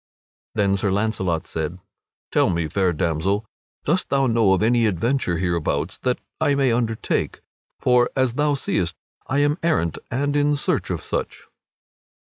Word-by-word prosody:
Then 100 -2 +2
Sir 100 - 0
Launcelot 95 -5 0
said: 80 +2 -4 0.5
"Tell - - +3
me, 85 -3 0
fair 95 +3 +1
damsel, 85 +6 0 0.4
dost 170 +5 +1
thou 135 -1 +2
know 115 -5 +4
of 95 - +1
any 115 0 +3
adventure 105 -1 0
hereabouts 85 -1 -1
that 125 -1 0 0.2
I 145 - +2
may 135 -3 +3
undertake? 115 -2 -1 0.4
For, 125 -1 +3
as 130 -3 +2
thou 145 +2 +2
seest, 90 -9 -1 0.3
I 135 +2 +1
am 145 +4 +2
errant 155 - +1
and 145 +3 -1
in 145 0 +3
search 145 - -1
of - - -3
such." - - -4
110 Hz, 150 wpm, -23 LUFS, 90-135 Hz, 0.5 s, know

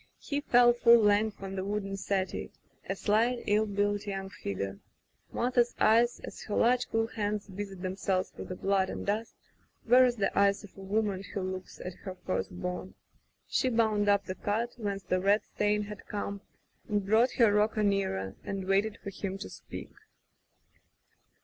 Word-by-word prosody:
He 285 -1 -3
fell 245 -3 +5
full 235 0 +7
length 210 -1 +2
on 195 0 -5
the 190 - -2
wooden 200 0 -2
settee 190 -1 -2 0.2
— - - -26
a 195 - 0
slight, 230 +5 +1
ill 215 +1 +2
built 205 0 0
young 195 -1 -4
figure. 100 - -4 0.5
Martha's 240 0 +1
eyes 235 +2 +4
as - - -8
her 210 - -3
large 245 +1 +3
cool 225 0 +1
hands 210 -2 -3
busied 195 -1 -7
themselves 185 0 -1
with - - -8
the 185 - -4
blood 195 0 +1
and - - -5
dust, 215 +3 -2 0.5
were 250 +2 +7
as 245 -1 +1
the 200 -4 -1
eyes 200 +1 +3
of 205 - -13
a 195 - -11
woman 200 0 0
who 200 +1 -5
looks 185 -1 -6
at 180 - -6
her 185 +1 -8
first 185 0 -3
born. 180 +1 -5 0.5
She 260 - +1
bound 220 -3 +2
up 200 -1 +3
the 185 - -3
cut 225 +5 -2
whence 200 -4 -3
the 185 +1 0
red 200 +3 +3
stain 210 0 +1
had 210 0 -9
come, 200 -1 -4 0.5
then 205 -1 +1
brought 220 +6 +3
her 225 -4 +4
rocker 210 +1 +2
nearer 190 - 0
and 195 -1 -4
waited 200 +3 +1
for 200 - -5
him 195 0 -4
to 195 - -8
speak. - - -9
205 Hz, 180 wpm, -30 LUFS, 195-220 Hz, 0.5 s, full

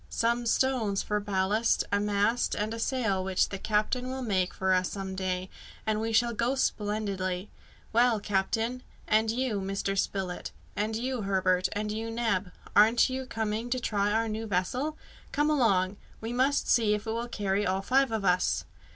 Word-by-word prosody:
Some 235 +1 0
stones 230 -6 +1
for 210 0 0
ballast, 205 +2 +1
a 200 - +3
mast, 210 +3 +1
and 215 +2 -2
a 230 - -5
sail, 225 -7 0
which 190 0 +1
the 195 - -5
captain 220 +5 0
will 260 0 -4
make 190 -5 +1
for 190 0 +1
us 185 0 +2
some 195 -1 -5
day, 185 -1 -2 0.4
and 215 0 0
we 225 0 -1
shall 235 +1 +3
go 235 +4 0
splendidly! 205 -5 -1 0.4
Well, 235 -1 +4
captain 220 +5 -1 0.3
and 220 +1 +3
you, 230 -3 0
Mr. 195 +1 -2
Spilett; 190 -2 -2 0.3
and 215 +2 -1
you, 250 +1 -2
Herbert; 185 -2 +1
and 210 +1 -2
you, 220 +1 -3
Neb 225 -5 0 0.3
aren't 225 +5 +5
you 260 0 -3
coming 220 0 -2
to 255 +1 0
try 205 -3 0
our 225 +1 +1
new 220 +1 -3
vessel? 250 +11 -1 0.3
Come 295 +1 +2
along! 200 -9 +2 0.2
we 225 +2 -4
must 265 +3 +2
see 215 -3 +4
if 210 +1 -6
it 220 - -2
will 230 +2 -2
carry 200 -2 0
all 190 +1 0
five 265 +2 +3
of 220 -3 -1
us!" 180 0 +2
215 Hz, 175 wpm, -29 LUFS, 195-235 Hz, 0.4 s, aren't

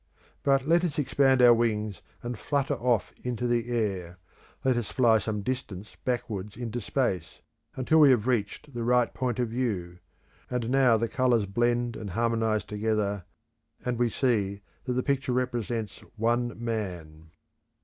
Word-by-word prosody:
But 135 0 +2
let 170 +2 +4
us 170 -5 -1
expand 135 -2 +3
our 120 -1 +9
wings 110 -3 0 0.2
and 120 0 -3
flutter 140 +5 -1
off 120 -4 0
into 125 -1 -2
the 120 0 0
air; 95 -7 -2 0.5
let 130 -1 +4
us 120 -3 -2
fly 115 -4 +4
some 105 -1 -3
distance 105 -5 -5
backwards 105 -5 -3
into 120 0 -4
Space 100 - -2 0.3
until 145 +5 +3
we 150 -2 +8
have 120 -5 +3
reached 125 +3 -1
the 120 - -4
right 120 0 +2
point 125 -3 -2
of 120 -2 0
view. 100 -8 -2 0.5
And 125 -1 -2
now 130 -4 +5
the 115 +1 0
colours 125 -5 +2
blend 120 +3 0
and 105 - -6
harmonise 115 +1 +1
together, 105 -2 -1 0.6
and 125 -1 -1
we 120 -1 +3
see 105 -5 0 0.2
that 125 - -1
the 125 +1 0
picture 135 -2 0
represents 120 -3 -2 0.2
One 120 +2 +1
Man. 90 -9 -5
120 Hz, 155 wpm, -28 LUFS, 105-125 Hz, 0.6 s, our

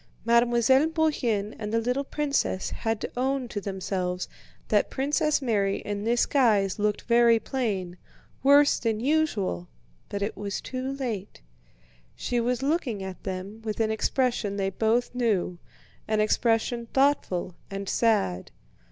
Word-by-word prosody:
Mademoiselle 240 +4 +4
Bourienne 255 -11 0
and 210 -1 -4
the 230 - +2
little 250 +4 0
princess 280 -9 -1
had 225 -1 -2
to - - -5
own 260 +1 0
to 205 -3 -4
themselves 185 -2 -3 0.4
that - - +3
Princess 295 +2 +1
Mary 200 -5 +1
in 205 0 -4
this 235 +1 +3
guise 210 -8 +2
looked 210 0 0
very 235 -1 +5
plain, 205 -8 -3 0.4
worse 285 +2 +5
than 225 -2 -1
usual, 230 - 0 0.4
but 200 0 -3
it 205 - -2
was 200 -1 -4
too 260 +1 -4
late. 225 - -5 0.7
She 245 - -1
was 245 +2 0
looking 270 - -1
at 190 -2 -7
them 190 +4 -6
with 215 -1 -4
an 220 -1 +2
expression 220 -2 0
they 195 -1 0
both 225 +5 +1
knew, 210 -8 0 0.5
an 215 0 +1
expression 230 +2 +1
thoughtful 265 -10 +1 0.2
and 195 0 -5
sad. 200 - +1
225 Hz, 140 wpm, -27 LUFS, 200-255 Hz, 0.7 s, very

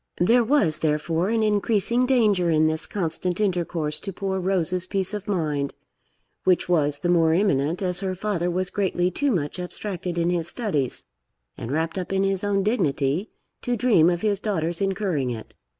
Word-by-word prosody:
There 235 +7 +4
was, 225 - +2
therefore, 160 +4 0
an 225 -1 +1
increasing 215 +3 +1
danger 210 -9 +3
in 155 -1 +3
this 155 0 +1
constant 180 -1 -2
intercourse 170 -6 0
to 195 - -6
poor 190 0 -3
Rose's 185 -1 0
peace 190 +1 -1
of 205 -1 -5
mind, 150 -8 -1 0.7
which 185 -1 +2
was 150 -5 +2
the 175 - -3
more 165 -2 +3
imminent 170 -2 +1
as 180 -1 0
her 190 -1 -2
father 185 -3 -1
was 185 +1 -2
greatly 185 -3 0
too 285 +10 0
much 170 - -1
abstracted 180 -1 -4
in 170 +1 +1
his 170 -2 -1
studies, 170 - -2 0.5
and 115 - -6
wrapped 160 +5 -1
up 180 - -5
in 195 0 +1
his 195 -1 0
own 200 -1 +1
dignity, 170 - 0 0.3
to 245 -1 -1
dream 205 -8 +4
of 175 -1 -1
his 205 -2 +1
daughter's 170 -5 -2
incurring 190 -9 0
it. 115 -2 -7
180 Hz, 175 wpm, -24 LUFS, 160-205 Hz, 0.7 s, There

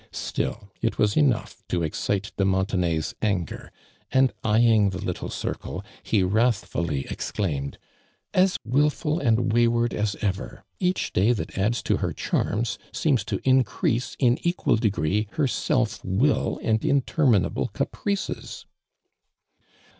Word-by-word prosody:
Still 100 -2 -4
it 115 - 0
was 105 -1 +2
enough 140 -7 +1
to 85 -2 -1
excite 100 +5 -2
de 95 - +1
Muntenay's 95 -4 0
nngei'. 95 -6 -2 0.4
and 130 -1 +4
eyeing 110 -1 +4
tlie 95 +1 -5
little 90 -3 -3
circle, - - -4 0.2
he 105 -4 +1
wrathliilly 90 - 0
exclaimed: 70 -9 -2
•• - - -17 0.6
As 185 0 +3
wilful 150 +5 +1
and 115 -3 +2
wayward 120 0 +3
as 105 -1 -1
ever! 100 -2 -3 0.2
Kacli 180 0 0
day 105 +7 +4
that 110 - -5
adds 105 +5 0
to - - +1
her - - -2
charms, 110 +2 -1
seems 145 - +1
to 105 -3 -2
in 130 0 +6
crease, 120 0 -1
in 125 -2 +3
equal 175 -9 +1
degree, 105 -2 0
her 155 -3 +1
self 125 -2 0
will 110 +11 +1
and 110 -1 +1
interminable 135 - +2
caprices 200 -1 -3
110 Hz, 130 wpm, -25 LUFS, 95-125 Hz, 0.6 s, in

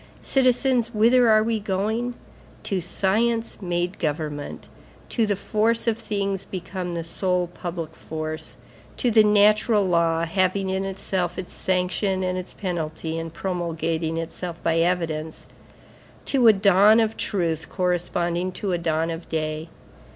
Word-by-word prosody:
Citizens, 250 -2 +2
whither 235 +3 +5
are 215 0 +5
we 225 0 0
going? 215 +5 -1 0.5
To 190 -2 -1
science 225 +6 0
made 175 0 -2
government, 150 -1 -3 0.4
to 230 -3 +1
the 205 - +1
force 225 +3 +1
of 230 -2 +2
things 200 -3 -2
become 180 -1 -5
the 165 - -3
sole 180 +1 0
public 170 -2 -6
force, 155 -3 -6 0.4
to 245 - +1
the 220 -1 +6
natural 210 0 +4
law, 170 -1 +2
having 190 +2 0
in 190 +1 -1
itself 190 -2 -2
its 185 - -6
sanction 185 +1 0
and 185 0 -1
its 185 0 -5
penalty 165 -3 -4
and 165 0 -5
promulgating 165 -2 -2
itself 170 +1 -5
by 165 0 +2
evidence, 165 -3 -1 0.8
to 255 -4 +4
a 220 - +9
dawn 200 +2 +5
of 225 -1 +1
truth 165 -5 -1
corresponding 175 0 -1
to 200 0 -3
a 175 - 0
dawn 165 0 0
of 165 +1 -7
day. 155 0 -3
185 Hz, 140 wpm, -24 LUFS, 165-210 Hz, 0.8 s, a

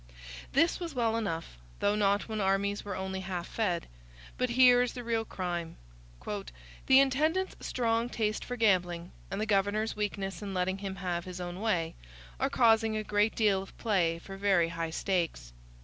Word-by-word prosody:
This 325 +5 +3
was 335 -5 -5
well 230 -2 +1
enough; 165 - -3 0.2
though 205 - +2
not 200 -1 +2
when 220 -2 -2
armies 200 +1 +1
were 200 -2 -4
only 190 0 -3
half 185 -2 -4
fed. 180 -7 -1 0.5
But 255 0 0
here 245 0 +6
is 250 - 0
the 245 - -6
real 230 -1 0
crime: 175 -5 -4 0.5
'The 210 +6 0
intendant's 310 +8 +1
strong 230 -1 0
taste 215 -3 -1
for 245 - -4
gambling, 180 -6 +1 0.2
and 195 +1 -3
the 215 - 0
governor's 210 +1 +1
weakness 200 -3 -3
in 200 -2 -5
letting 185 +1 0
him 195 -1 -4
have 180 -3 -3
his 180 -1 -7
own 175 0 -5
way, 175 -7 0 0.5
are - - +1
causing 225 -2 +3
a 215 - -2
great 210 +1 +1
deal 205 -4 +3
of 195 - -12
play 180 -7 +1
for 195 +3 -9
very 190 -4 +3
high 165 -1 -3
stakes. 165 - -2
200 Hz, 175 wpm, -30 LUFS, 180-225 Hz, 0.5 s, here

